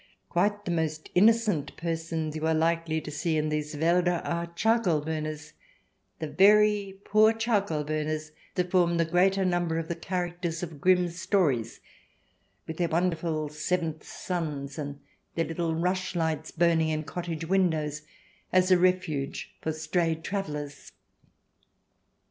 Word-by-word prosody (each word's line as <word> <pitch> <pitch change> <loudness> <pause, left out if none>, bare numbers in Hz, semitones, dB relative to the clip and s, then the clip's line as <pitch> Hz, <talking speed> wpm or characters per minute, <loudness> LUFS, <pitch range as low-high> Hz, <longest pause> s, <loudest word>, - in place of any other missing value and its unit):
Quite 205 0 +1
the 175 - -1
most 160 -2 -2
innocent 210 -6 +3
persons 165 -1 -3
you 155 0 -1
are 160 - +2
likely 165 0 +1
to 150 - -7
see 160 +2 -1
in 155 0 0
these 150 0 -3
Walder 175 +2 +2
are 170 0 -2
charcoal 220 -7 +2
burners 155 -1 -4 0.3
— - - -46
the 155 - -3
very 205 +2 +4
poor 215 +1 +5
charcoal 205 -9 0
burners 155 +1 -2 0.2
that 180 -1 -1
form 175 -2 +3
the 165 - +3
greater 190 +3 +3
number 175 -2 0
of 165 0 -3
the 170 - -1
characters 175 -1 -3
of 160 -5 -7
Grimm's 180 -1 +2
stories, 135 - +1 0.8
with 160 - -6
their 175 - +1
wonderful 165 -2 0
seventh 160 +1 -2
sons 150 -5 -4
and 145 -1 -5 0.4
their 165 - +1
little 165 0 -2
rush 180 +2 -1
lights 160 -2 -1
burning 165 -1 +2
in 155 0 -1
cottage 165 -1 -5
windows 160 -5 +1 0.5
as 185 0 +3
a 180 - +6
refuge 175 -6 0
for 160 - -1
strayed 160 +1 -1
travellers. 150 -8 -5
165 Hz, 145 wpm, -28 LUFS, 155-180 Hz, 0.8 s, a